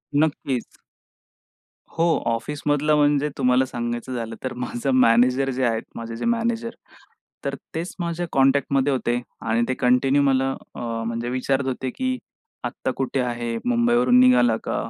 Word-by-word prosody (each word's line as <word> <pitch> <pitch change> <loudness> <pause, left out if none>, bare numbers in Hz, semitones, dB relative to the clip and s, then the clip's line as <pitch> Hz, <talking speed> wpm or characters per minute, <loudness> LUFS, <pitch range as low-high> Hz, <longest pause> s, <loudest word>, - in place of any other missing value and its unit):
नक्कीच. 145 -4 -1 1.2
हो. 165 0 +3 0.2
ऑफिसमधलं 145 +4 0
म्हणजे 145 0 +3
तुम्हाला 125 0 +3
सांगायचं 120 0 -4
झालं, 115 -2 -4
तर 130 - -3
माझं 125 +1 -3
मॅनेजर 125 +2 +4
जे 130 0 -2
आहेत 115 -1 0
माझे 115 0 -6
जे - - -4
मॅनेजर, 230 0 0 0.8
तर - - -1 0.2
तेच 165 +3 -4
माझ्या 170 0 -2
कॉन्टॅक्टमध्ये 135 0 +2
होते 120 -2 0 0.2
आणि 115 +1 0
ते 130 - 0
कंटिन्यू 130 +3 +3
मला 135 -1 +2 0.3
अ, - - -7 0.3
म्हणजे 115 +1 -3
विचारत 130 +2 0
होते, 130 0 -2
की 255 - -2 0.5
"आत्ता 130 - -3
कुठे 135 0 -1
आहे? 120 -1 -2
मुंबईवरून 120 +1 +4
निघाला 125 -2 +5
का? - - -3
130 Hz, 140 wpm, -23 LUFS, 120-145 Hz, 1.2 s, निघाला